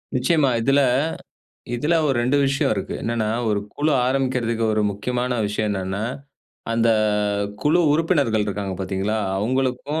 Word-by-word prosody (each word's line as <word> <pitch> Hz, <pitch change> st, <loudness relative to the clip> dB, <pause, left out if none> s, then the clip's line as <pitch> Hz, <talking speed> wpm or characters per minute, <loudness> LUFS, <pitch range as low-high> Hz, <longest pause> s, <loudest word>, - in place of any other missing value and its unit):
நிச்சியமா 140 Hz, +2 st, +2 dB
இதில 135 Hz, +4 st, +3 dB, 1.0 s
இதில 150 Hz, +8 st, +1 dB
ஒரு 135 Hz, -, +1 dB
2 130 Hz, +4 st, +2 dB
விஷயம் 140 Hz, 0 st, +1 dB
இருக்கு. 95 Hz, -, -4 dB
என்னென்னா, 115 Hz, -2 st, -1 dB, 0.2 s
1 105 Hz, -1 st, +1 dB, 0.2 s
குழு 150 Hz, +2 st, +1 dB
ஆரம்பிக்கிறதுக்கு 125 Hz, -3 st, 0 dB
ஒரு 105 Hz, -, +1 dB
முக்கியமான 125 Hz, +5 st, -2 dB
விஷயம் 105 Hz, +1 st, -1 dB
என்னன்னா, 95 Hz, +1 st, -3 dB, 0.7 s
அந்த 115 Hz, 0 st, +2 dB, 0.7 s
குழு 155 Hz, +4 st, +3 dB
உறுப்பினர்கள் 145 Hz, -, +1 dB
இருக்காங்க 100 Hz, -2 st, -3 dB
பாத்தீங்களா, 95 Hz, +3 st, -2 dB, 0.2 s
அவுங்களுக்கும், 130 Hz, +7 st, -1 dB
125 Hz, 125 wpm, -22 LUFS, 105-140 Hz, 1.0 s, இதில